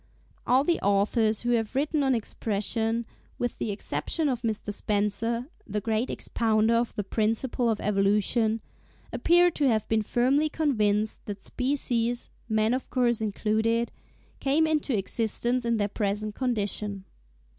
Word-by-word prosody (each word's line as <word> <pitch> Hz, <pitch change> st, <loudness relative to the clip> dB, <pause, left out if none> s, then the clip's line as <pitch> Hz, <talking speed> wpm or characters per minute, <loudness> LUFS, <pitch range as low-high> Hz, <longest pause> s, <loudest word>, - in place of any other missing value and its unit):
' -, -, -32 dB
All 255 Hz, +2 st, +4 dB
the 340 Hz, +3 st, +1 dB
authors 210 Hz, +2 st, +2 dB
who 240 Hz, -, 0 dB
have 230 Hz, 0 st, 0 dB
written 295 Hz, +2 st, +1 dB
on 265 Hz, -2 st, +3 dB
Expression, 225 Hz, +1 st, -2 dB, 0.3 s
with 245 Hz, 0 st, -3 dB
the -, -, -2 dB
exception 285 Hz, +9 st, -1 dB
of 245 Hz, -3 st, -2 dB
Mr. 215 Hz, -2 st, -2 dB
Spencer—the 210 Hz, -, -2 dB
great 225 Hz, +3 st, 0 dB
expounder 220 Hz, 0 st, +1 dB
of 235 Hz, 0 st, 0 dB
the 205 Hz, -, -2 dB
principle 225 Hz, +4 st, 0 dB
of 220 Hz, -, 0 dB
Evolution—appear 220 Hz, -, +1 dB
to 295 Hz, -3 st, +1 dB
have 220 Hz, -4 st, +1 dB
been 220 Hz, -1 st, +2 dB
firmly 265 Hz, +8 st, +2 dB
convinced 215 Hz, -9 st, 0 dB
that 205 Hz, -1 st, -5 dB
species, 245 Hz, -3 st, -1 dB, 0.2 s
man 220 Hz, +1 st, +2 dB
of 255 Hz, -, -3 dB
course 240 Hz, -3 st, +1 dB
included, 220 Hz, +2 st, 0 dB, 0.5 s
came 285 Hz, +4 st, +2 dB
into 300 Hz, -6 st, 0 dB
existence 235 Hz, +4 st, 0 dB
in 235 Hz, -1 st, +1 dB
their 205 Hz, -1 st, +1 dB
present 210 Hz, 0 st, -2 dB
condition. 210 Hz, -5 st, -2 dB
225 Hz, 135 wpm, -27 LUFS, 210-250 Hz, 0.5 s, All